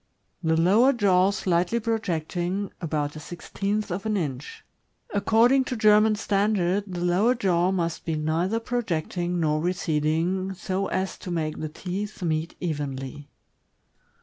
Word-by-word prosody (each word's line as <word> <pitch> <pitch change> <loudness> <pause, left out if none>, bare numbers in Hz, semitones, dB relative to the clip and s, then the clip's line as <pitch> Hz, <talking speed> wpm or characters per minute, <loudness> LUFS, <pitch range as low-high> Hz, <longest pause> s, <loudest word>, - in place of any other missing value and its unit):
The 160 -1 +2
lower 215 +11 +5
jaw 195 -5 +3
slightly 185 +2 +1
projecting— 190 -3 -2
about 150 -3 -2
a - - -6
sixteenth 200 +5 -3
of 180 +3 -3
an 215 -1 +1
inch. 145 -6 -5 0.5
According 230 +6 +4
to 250 - -3
German 215 0 +5
standard, 200 -2 +1
the 180 -2 -5
lower 195 +8 +3
jaw 180 -6 +2
must 170 -3 -2
be 160 - -2
neither 165 +8 0
projecting 180 -7 -2
nor 155 -2 +1
receding, 175 +2 0
so 190 +2 -2
as 190 0 -2
to 185 - -8
make 160 -3 -2
the 155 - -3
teeth 190 +5 -5
meet 160 0 -1
evenly. 145 -3 -4
180 Hz, 135 wpm, -25 LUFS, 160-205 Hz, 0.5 s, lower